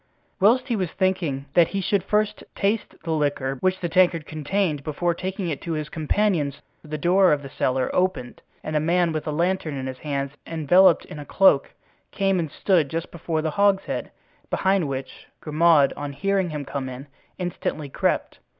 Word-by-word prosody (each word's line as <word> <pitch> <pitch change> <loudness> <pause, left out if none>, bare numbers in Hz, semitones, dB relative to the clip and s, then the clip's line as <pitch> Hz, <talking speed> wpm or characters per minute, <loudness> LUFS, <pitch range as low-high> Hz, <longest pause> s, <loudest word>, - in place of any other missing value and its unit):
Whilst 245 +7 +4
he 240 - 0
was 185 -5 -1
thinking 175 -8 -1
that 170 -2 +5
he 195 - -3
should 190 0 0
first 210 0 0
taste 210 +2 -1
the 165 - -3
liquor 145 -3 0
which 185 0 +1
the 175 - -1
tankard 175 -2 +3
contained 155 0 -1
before 170 +4 -1
taking 190 +1 -4
it 150 - -4
to 170 - -3
his 155 -1 -3
companions, 155 -3 0 0.2
the 155 -1 -5
door 180 +4 +4
of 145 -1 +1
the 135 - -9
cellar 130 -2 0
opened 180 -9 -1 0.2
and 155 - -4
a - - +4
man 170 +2 +2
with 155 -1 -4
a - - 0
lantern 170 -1 -1
in 130 -1 -4
his 130 -1 -6
hands 140 -2 -3
and 165 -1 -5
enveloped 175 +3 +5
in 150 - -9
a - - -6
cloak, 190 -8 +3 0.3
came 195 -2 +1
and 160 -3 -2
stood 165 -2 +1
just 165 +3 -4
before 160 -2 -3
the 160 - -1
hogshead, 200 +2 +1 0.4
behind 190 -4 +1
which 135 -1 -6
Grimaud, 155 -2 +4
on 145 0 -5
hearing 195 +3 0
him 150 -2 -5
come 135 -1 -4
in, 130 +2 -8 0.3
instantly 175 -4 -3
crept. 135 - -1
165 Hz, 185 wpm, -24 LUFS, 145-185 Hz, 0.4 s, that